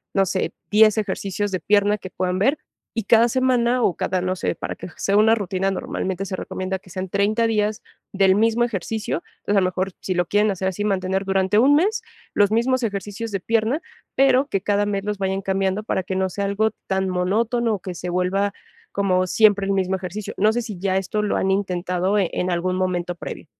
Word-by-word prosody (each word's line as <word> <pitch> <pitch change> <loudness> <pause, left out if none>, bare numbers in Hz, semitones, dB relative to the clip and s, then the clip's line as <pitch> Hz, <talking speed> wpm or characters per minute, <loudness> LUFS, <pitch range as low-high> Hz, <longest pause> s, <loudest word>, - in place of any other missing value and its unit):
no 195 -1 +4
sé, 185 0 -2 0.2
10 215 0 +6
ejercicios 205 -1 -2
de 185 - -1
pierna, 205 +2 +3
que 185 - -8
puedan 185 0 -1
ver. 270 +10 +3 0.4
Y 225 - -1
cada 230 +2 +5
semana, 250 -1 +2
o 180 - +2
cada, 185 - -1
no 185 +1 -1
sé, - - -2
para - - -5
que - - -9
sea 200 - 0
una 220 +1 +5
rutina, 195 -2 -1
normalmente, 190 0 -3
se 185 -1 -4
recomienda 185 +1 -4
que 185 - -19
sean 185 +2 -4
30 210 +4 +1
días, 210 -1 0 0.3
del 195 -1 +4
mismo 225 +2 +3
ejercicio. 215 -4 -3 0.2
Entonces, 205 - +1
a - - +1
lo - - +2
mejor, 185 +1 -1
si 185 - -2
lo 175 0 +1
quieren 210 +4 +2
hacer 190 0 -2
así, 190 +2 -4
mantener 190 -1 0
durante 190 +1 +2
un 275 +5 +5
mes, 400 +9 +2 0.3
los 205 -1 +4
mismos 250 +3 +2
ejercicios 205 +1 -4
de 195 - -1
pierna, 230 - 0 0.3
pero 270 0 +4
que, 195 - 0
cada 205 0 +1
mes 200 -1 -2
los 210 -1 -2
vayan 190 0 -1
cambiando, 195 +1 0
para 200 - -1
que 190 +1 -4
no 190 0 0
sea 200 +2 -3
algo 210 +2 +1 0.2
tan 190 0 0
monótono, 220 +6 +1
o 195 - -7
que 185 0 -6
se 180 - -5
vuelva 185 +3 0 0.4
como 185 -2 +1
siempre 205 0 +4
el - - +1
mismo 190 -1 0
ejercicio. 190 +2 -5
No 215 +2 +4
sé, 240 - 0
si 210 -6 -7
ya 190 0 0
esto 195 +3 -1
lo 210 - 0
han 190 - +1
intentado, 185 0 0
en 185 -1 -1
algún 180 +1 0
momento 180 -1 -1
previo. 155 -5 -7
195 Hz, 215 wpm, -22 LUFS, 185-215 Hz, 0.4 s, 10